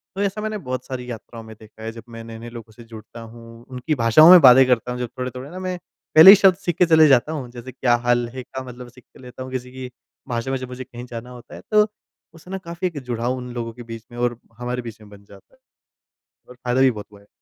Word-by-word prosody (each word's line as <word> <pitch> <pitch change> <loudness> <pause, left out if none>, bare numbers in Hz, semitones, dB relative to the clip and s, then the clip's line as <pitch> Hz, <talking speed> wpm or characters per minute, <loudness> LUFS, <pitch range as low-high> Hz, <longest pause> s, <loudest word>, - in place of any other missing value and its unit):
तो 195 - -3
ऐसा 200 +1 -2
मैंने 215 0 -3
बहुत 130 - -6
सारी 125 -1 -7
यात्राओं 115 0 -10
में 110 0 -12
देखा 110 0 -15
है, 110 - -5
जब 115 0 -12
मैं 115 -1 -10
नए-नए 115 +1 -10
लोगों 115 -1 -11
से 120 - -14
जुड़ता 115 0 -12
हूँ, 115 0 -14
उनकी 130 +4 -3
भाषाओं 120 +6 +6
में 185 - +10
बातें 130 -1 +8
करता 125 -1 0
हूँ। 125 - -5
जो 125 - -3
थोड़े-थोड़े 130 +2 -7
ना 185 - -9
मैं, 185 -1 -4 0.4
पहले 160 +4 +10
ही 210 - +10
शब्द 195 -2 +4
सीख 175 -4 -3
के 180 - +4
चले 160 -2 +5
जाता 135 +2 +3
हूँ। 135 -6 -6
जैसे 120 +1 -10
क्या 125 -1 +1
हाल 120 0 +2
है 130 -1 -7
का 130 +1 -8
मतलब 125 -1 -11
सीख 125 +1 -19
के - - -20
लेता 125 0 -10
हूँ। 130 - -10
किसी 125 -1 -6
की 130 -1 -8 0.4
भाषा 120 +2 -3
में 135 - -1
जब 130 0 -7
मुझे 125 +1 -7
कहीं 120 -1 -11
जाना 120 0 -9
होता 125 -1 -13
है। - - -11
तो 210 0 +4 0.5
उससे 170 +2 -15
ना 195 - -3
काफ़ी 170 +2 -3
एक 160 -5 -6
जुड़ाव 120 +1 -2
उन 125 -1 -8
लोगों 115 -1 -5
के 120 - -11
बीच 115 -1 -10
में, 120 - -11
और 120 -1 -1 0.2
हमारे 125 +1 -4
बीच 115 -2 -10
में 105 - -15
बन 100 0 -16
जाता - - -19
है, - - -35 0.9
और 125 - -13
फ़ायदा 125 +1 -1
भी 135 -1 +5
बहुत 105 -3 -8
हुआ 100 - -16
है। 100 - -25
125 Hz, 270 wpm, -21 LUFS, 115-135 Hz, 0.9 s, में